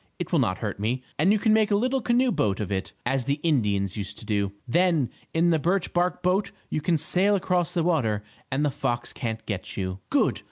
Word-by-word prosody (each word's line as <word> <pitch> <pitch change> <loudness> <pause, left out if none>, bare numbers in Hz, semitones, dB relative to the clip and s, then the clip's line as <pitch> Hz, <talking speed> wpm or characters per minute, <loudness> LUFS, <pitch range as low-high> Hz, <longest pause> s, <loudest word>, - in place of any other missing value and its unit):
It - - -5
will - - +3
not 95 0 +1
hurt 105 -3 -4
me, 120 +5 -1 0.2
and 175 +6 +4
you 215 - +4
can 215 +1 +3
make 220 -1 +4
a 205 - +3
little 255 +5 +1
canoe 245 +2 +2
boat 100 - 0
of 105 -2 -3
it, 95 -1 -2
as 130 0 0
the 140 +1 0
Indians 105 - +1
used 100 0 -5
to - - -10
do. 100 -2 0 0.2
Then, 165 -2 +2 0.2
in 170 +1 +3
the 160 - +3
birch 180 +4 0
bark 180 +1 0
boat 190 +3 +1 0.2
you 155 - -1
can 165 +2 +2
sail 185 +6 +2
across 180 -3 0
the 170 - +2
water 120 -12 +1 0.3
and 140 +3 +1
the 145 - +1
fox 120 -3 -2
can't 110 -2 -4
get 100 -4 -4
you." 95 -1 -3
"Good! - - +2
150 Hz, 230 wpm, -26 LUFS, -, 0.3 s, and